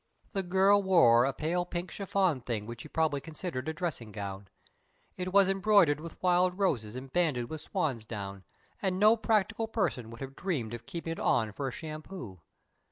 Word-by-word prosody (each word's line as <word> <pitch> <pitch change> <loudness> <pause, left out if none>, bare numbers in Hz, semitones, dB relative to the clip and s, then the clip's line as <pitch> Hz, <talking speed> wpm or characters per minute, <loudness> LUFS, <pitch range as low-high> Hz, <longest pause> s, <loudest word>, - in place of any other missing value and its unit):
The 195 - 0
girl 190 +2 +4
wore 145 -12 +6
a 135 - +1
pale 165 +6 -1
pink 175 0 -5
chiffon 190 -7 0
thing 115 -3 -3
which 115 +1 -7
she - - -9
probably 155 -2 0
considered 160 -3 -5
a - - -2
dressing 155 -10 -4
gown. 100 -1 -6 0.7
It 185 0 -4
was 195 0 +6
embroidered 195 -6 +4
with 165 +1 -9
wild 180 0 +3
roses 120 - 0
and 130 +1 -8
banded 145 -9 +1
with 160 -1 -5
swansdown, 110 - -3 0.4
and 190 -2 0
no 215 +2 +7
practical 225 0 +1
person 170 - -1
would 115 +2 -11
have 135 0 -6
dreamed 140 - -2
of 120 0 -8
keeping 165 -1 -5
it 165 - -4
on 110 -2 +2
for 135 +6 -4
a - - -2
shampoo. 155 - -8
160 Hz, 180 wpm, -30 LUFS, 120-185 Hz, 0.7 s, no